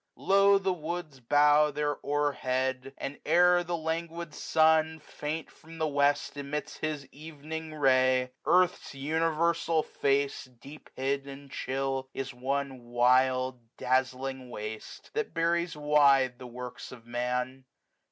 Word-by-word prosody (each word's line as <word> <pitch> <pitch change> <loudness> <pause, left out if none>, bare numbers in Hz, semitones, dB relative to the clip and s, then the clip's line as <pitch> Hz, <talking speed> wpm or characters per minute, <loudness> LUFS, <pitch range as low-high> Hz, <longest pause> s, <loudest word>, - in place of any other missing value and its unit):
Low, 195 +1 +4
the 195 -1 0
woods 160 -4 -5
235 120 - -32
Bow 150 +1 +5
their 145 0 -1
hoar 145 0 +1
head; 130 +1 -2
and, 140 - -6
ere 175 +2 +4
the 175 0 -2
languid 165 0 -4
sun 160 0 +3
Faint 150 +1 -5
from 165 +1 -14
the 160 -1 0
west 145 0 +1
emits 145 +1 -4
his 155 -3 -3
evening 155 +1 -8
ray. 130 -2 +3
Earth's 180 -5 +2
universal 160 +2 +1
face, 140 0 0
deep 130 +4 -14
hid, 140 +1 -1
and 140 0 -10
chill. 135 0 -2
Is 135 -1 -4
one 135 0 -3
wild 130 +1 +2 0.2
dazzling 130 0 -1
waste, 110 -1 -8
that 450 -1 -3
buries 170 0 0
wide 140 -4 +4
The 125 - -8
works 125 0 -8
of 120 -2 -12
Man. 125 +2 -3
140 Hz, 130 wpm, -29 LUFS, 130-160 Hz, 0.2 s, Bow